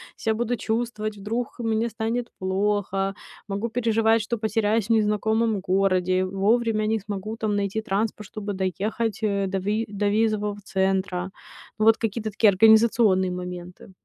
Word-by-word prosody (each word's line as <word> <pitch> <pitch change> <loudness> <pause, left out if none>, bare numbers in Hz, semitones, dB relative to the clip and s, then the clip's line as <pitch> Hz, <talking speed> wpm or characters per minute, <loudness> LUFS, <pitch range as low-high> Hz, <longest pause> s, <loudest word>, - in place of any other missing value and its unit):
ся 220 - -1
буду 240 +2 -1
чувствовать, 220 -1 -2
вдруг 225 +5 -4
мне 225 0 0
станет 230 +2 -3
плохо, 195 0 0 0.3
могу 200 +3 -3
переживать, 225 -1 +2
что 235 +2 -3
потеряюсь 220 -1 +1
в - - -25
незнакомом 220 0 +2
городе, 185 -1 +1
вовремя 215 +3 +1
не 220 0 +1
смогу 205 +2 -5
там 215 -2 -1
найти 200 +2 -1
транспорт, 210 -1 -2
чтобы 205 0 -5
доехать, 200 +3 -2
э, 200 -2 0
до 195 0 -2
ви 210 +4 -1
до 205 0 -2
визового 210 -1 +1
центра. 190 -1 -1 0.5
Ну, 215 - +1
вот 225 0 +6
какие-то 220 -1 -3
такие 215 +1 +4
организационные 220 -2 +5
моменты. 180 0 -7
210 Hz, 145 wpm, -24 LUFS, 195-225 Hz, 0.5 s, вот